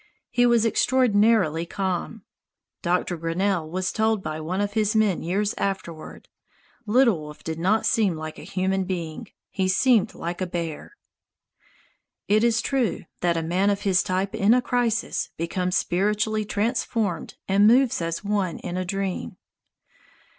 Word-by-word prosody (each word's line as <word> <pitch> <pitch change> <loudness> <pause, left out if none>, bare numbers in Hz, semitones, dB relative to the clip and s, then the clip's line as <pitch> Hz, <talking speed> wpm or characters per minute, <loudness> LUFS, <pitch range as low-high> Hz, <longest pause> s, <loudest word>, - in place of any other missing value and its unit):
He 245 0 +3
was 235 -1 +3
extraordinarily 220 -9 +3
calm. 190 +3 -3 0.6
Doctor 180 0 0
Grinnell 165 0 -1
was 185 +2 -2
told 220 -2 0
by 155 0 -4
one 180 +5 -3
of 205 0 -1
his 215 -1 +1
men 215 -5 +2
years 200 +5 -1
afterward: 180 -5 -4 0.6
"Little 230 -4 +4
Wolf 150 0 -10
did 160 0 -4
not 205 +6 +2
seem 205 -6 +2
like 155 0 -7
a - - -9
human 190 +2 -1
being. 170 -4 -5 0.2
He 190 -1 0
seemed 225 +3 +3
like 175 +2 -5
a 185 - -1
bear." 170 - -5 1.3
It 215 +2 +3
is 230 -2 +3
true 265 -5 -1
that 170 -1 +1
a 165 - -1
man 180 +5 +1
of 200 0 0
his 190 -2 +3
type 185 +1 -2
in 210 +4 +4
a 250 - +3
crisis 235 -2 0
becomes 180 +2 -1
spiritually 210 +3 0
transformed 210 -4 -1
and 200 +2 +4
moves 245 -2 +4
as 165 +2 -3
one 200 -4 -1
in 180 0 -5
a 185 - -1
dream. 190 - -3
195 Hz, 150 wpm, -24 LUFS, 175-215 Hz, 1.3 s, Little